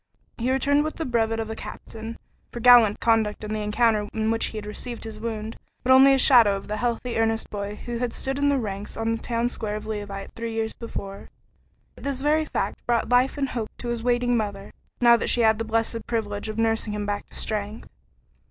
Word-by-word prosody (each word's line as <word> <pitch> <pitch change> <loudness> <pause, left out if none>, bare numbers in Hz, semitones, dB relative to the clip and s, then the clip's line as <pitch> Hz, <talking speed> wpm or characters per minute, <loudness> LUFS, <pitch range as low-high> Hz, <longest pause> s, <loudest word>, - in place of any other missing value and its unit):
He 245 +3 0
returned 285 +2 +3
with 310 - -4
the 325 - -3
brevet 225 -2 0
of 225 0 -3
a - - -4
captain, 225 +1 -8 0.3
for 240 - -6
gallant 235 -3 +7
conduct 220 -2 +1
in 210 0 -4
the 215 - -2
encounter 210 0 +1
in 220 0 +1
which 225 - +1
he 220 - -4
received 215 +3 -7
his 220 -1 -6
wound, 220 -1 -5 0.3
but 255 - +2
only 265 +1 +8
a 270 - +5
shadow 235 -6 +6
of 195 - -7
the 210 - -3
healthy, 240 0 -1
earnest 225 0 0
boy 205 0 -4
who 235 +2 -5
had 245 -1 -1
stood 270 +3 -2
in 285 0 +3
the 280 - +2
ranks 205 -4 -5
on 225 0 0
the 225 - 0
town 235 0 -1
square 215 -3 -4
of 215 - -6
Leauvite 205 -2 -5
three 230 0 -5
years 225 0 -2
before; 200 -4 -7 0.7
yet - - -14
this 275 -2 -2
very 305 +2 +2
fact - - -3
brought 235 -2 +1
life 250 +3 +3
and 275 -2 -1
hope 230 -4 -3
to 240 - -5
his 235 -1 -2
waiting 245 0 +1
mother, 205 -3 -3 0.3
now 240 -1 +7
that - - -1
she 240 - +2
had 220 -1 +4
the - - 0
blessed 225 0 -1
privilege 210 -2 -2
of 215 - -5
nursing 225 -1 0
him 210 0 -3
back 205 0 -3
to - - -16
strength. 210 0 -4
225 Hz, 225 wpm, -25 LUFS, 215-245 Hz, 0.7 s, only